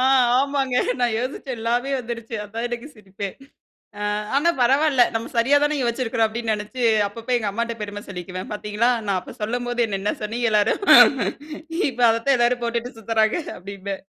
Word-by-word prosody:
ஆ - - +2 0.4
ஆமாங்க, 275 -2 -1 0.3
நான் 240 -2 +2
யோசிச்சேன் 255 0 -4
எல்லாமே 240 +4 0
வந்துருச்சு 230 -1 -6
அதான் 225 +3 -4
எனக்கு 240 +3 -5
சிரிப்பேன். 195 -1 -7 0.7
ஆ - - -5 0.3
ஆனா, 295 +5 +3
பரவால்ல 270 +1 +4
நம்ம 225 - -2
சரியா 270 +5 +4
தானே 295 0 +1
யோச்சிருக்கிறோம் 235 -2 0
அப்டின்னு 225 0 -3
நெனைச்சு 245 +5 -5 0.2
அப்பப்ப 230 +4 -5
எங்க 215 -3 -2
அம்மாட்ட 235 +2 -2
பெரும 205 0 -6
சொல்லிக்குவேன் 185 +2 -7
பார்த்தீங்களா, 210 +3 0 0.2
நான் 195 -2 +1
அப்போ 180 - -11
சொல்லும்போது 245 +2 -1
என்ன 195 -2 -3
என்ன 205 - 0
சொன்னீங்க 230 +2 -1
எல்லாரும் 210 - +2 1.1
இப்ப 245 -1 -6
அதத்தான் 240 +4 +2
எல்லாரும் 240 0 +1
போட்டுட்டு 235 +1 -2
சுத்துறாங்க 220 +2 +1 0.2
அப்டின்பேன். 195 +1 -7
230 Hz, 155 wpm, -22 LUFS, 210-245 Hz, 1.1 s, பரவால்ல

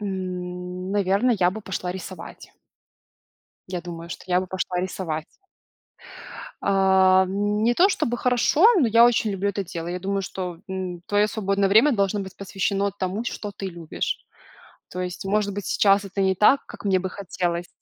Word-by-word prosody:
М. 180 -1 -5
Наверное, 205 +5 +2
я 180 -1 +4
бы 220 +4 -7
пошла 185 -2 -4
рисовать. 185 0 -9 1.2
Я 180 -2 -3
думаю, 170 -1 -8
что - - -8
я 180 0 +2
бы 185 - -5
пошла 180 0 -2
рисовать. 165 -4 -3 1.4
А, 190 -1 +4
не 210 +4 +1
то, 370 +8 +5
чтобы 240 - -1
хорошо, 250 - +3
но 245 - +3
я 230 +2 +6
очень 230 -3 +3
люблю 195 +1 -1
это 200 0 -3
дело. 170 -2 -6
Я 180 +1 -4
думаю, 195 +1 -1
что, 180 -2 -5
м, 185 -2 -4
твое 205 +1 +2
свободное 200 -2 0
время 230 +8 +5
должно 200 -1 +1
быть 190 -1 -8
посвящено 200 +1 -1
тому, 195 +2 -3
что 210 -3 -5
ты 195 - -5
любишь. 170 -3 -4 0.7
То 180 - -5
есть, 180 +1 -5
может 200 0 0
быть, 205 - -5
сейчас 200 0 +3
это 195 0 -4
не 190 0 +2
так, 215 +9 +4
как - - -11
мне 190 -2 +3
бы 190 - -3
хотелось. 175 -2 -3
190 Hz, 170 wpm, -24 LUFS, 180-205 Hz, 1.4 s, я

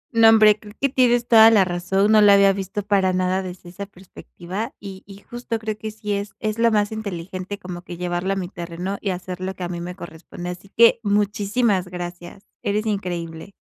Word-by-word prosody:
No, 225 -1 +7
hombre, 215 -1 +6
creo 210 0 -14
que 275 - +1
tienes 245 -2 +2
toda 225 -1 +8
la 210 -4 +4
razón, 190 +4 0
no 215 - +6
la 205 -1 +7
había 200 0 +5
visto 195 +2 -4
para 195 -2 +2
nada 185 +1 0
desde 180 -1 -9
esa 200 +3 -8
perspectiva, 190 +3 -8
y 195 -2 -9
y 195 -1 -11
justo 240 -1 -5
creo 220 -1 -4
que 215 +1 -6
sí 210 -1 -5
es 200 0 -4
es 215 +1 -3
lo 235 0 +4
más 210 -1 +1
inteligente, 190 -2 -6
como 180 -3 -8
que 175 -1 -9
llevarla 180 +2 -2
a - - -3
mi 190 -2 -3
terreno, 175 +2 -6
y 200 - -2
hacer 180 0 -5
lo 190 +1 -4
que 180 - -7
a 175 - -3
mí 175 -1 -5
me 180 +1 -6
corresponde. 175 0 -9
Así 180 +2 -11
que 230 +2 +5
muchísimas 205 -1 0
gracias, 175 +2 -8 0.2
eres 210 +2 -1
increíble. 175 -4 -4
195 Hz, 210 wpm, -22 LUFS, 180-215 Hz, 0.2 s, toda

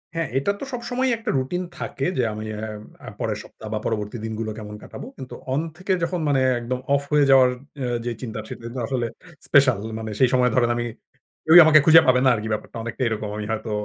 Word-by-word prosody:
হ্যাঁ, 165 -1 -1
এটা 140 +9 +1
তো - - -6
সবসময়ই 250 +2 -1
একটা 225 0 -5
রুটিন 155 +8 -2
থাকে - - -4
যে 125 - +2
আমি 110 +1 -6
অ্যা 110 +1 -5 0.4
আ - - -4
পরের - - -2
সপ্তাহ 110 - -12
বা 110 - -1
পরবর্তী 105 0 -2
দিনগুলো 110 0 -4
কেমন 105 -1 -8
কাটাবো। - - -9
কিন্তু 130 - -9 0.2
অন 140 - +1 0.2
থেকে 190 +1 -1
যখন 175 +1 -1
মানে 140 -2 +2 0.2
একদম 125 +2 -3 0.2
অফ 140 - +1
হয়ে 150 -1 +4
যাওয়ার 130 -2 +7 0.3
আ - - -1 0.2
যে 120 - -1
চিন্তা 110 -3 -5
সেটা 115 - -9
হচ্ছে 120 +2 -5
আসলে 125 -3 -1 0.4
স্পেশাল 135 -4 +5 0.2
মানে 110 -1 -5
সেই 130 - +5
সময় 125 -1 +4
ধরেন 120 -2 +3
আমি 120 0 -2 0.6
কেউই 160 +2 +8
আমাকে 155 -1 +7
খুঁজে 165 0 +9
পাবে 125 0 +5
না - - +6
আর - - -3
কি - - -4
ব্যাপারটা 110 - -5
অনেকটাই 120 +2 -3
এরকম 110 -1 -3
আমি 105 - -4
হয়তো 110 0 -3
125 Hz, 220 wpm, -23 LUFS, 110-155 Hz, 0.6 s, খুঁজে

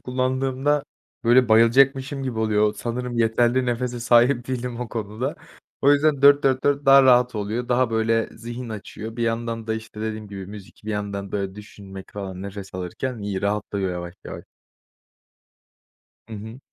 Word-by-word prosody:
kullandığımda, 130 +3 0 0.4
böyle, 120 0 +5
bayılacakmışım 135 +5 +4
gibi 125 -4 -3
oluyor. 105 -1 +2
Sanırım 120 +1 -4
yeterli 120 +3 +2
nefese 120 0 -2
sahip 120 +2 +3
değilim 125 -1 -3
o 125 - -4
konuda. 115 +6 -4 0.5
O 140 +1 +6
yüzden 145 -1 +2
4-4-4 140 0 +4
daha 135 0 +8
rahat 125 -1 +4
oluyor. 110 +4 -3
Daha, 125 0 +2
böyle, 115 0 +1
zihin 120 +2 -7
açıyor. 110 +1 -7
Bir 120 - -2
yandan 115 0 -2
da, 110 - -1
işte, 110 -1 -8
dediğim 110 -1 -4
gibi, 100 -2 -7
müzik, 100 -1 -12
bir 110 - -4
yandan 100 -2 -4
da 100 -1 -2
düşünmek 100 -2 -11
falan 95 -2 -6
nefes 100 -1 -8
alırken 100 +7 -4
iyi, 100 -2 -4
rahatlıyor 100 -2 -1
yavaş 85 0 -6
yavaş. - - -8 1.9
Hı - - -7
hı. 110 +4 -9
115 Hz, 150 wpm, -23 LUFS, 105-130 Hz, 1.9 s, daha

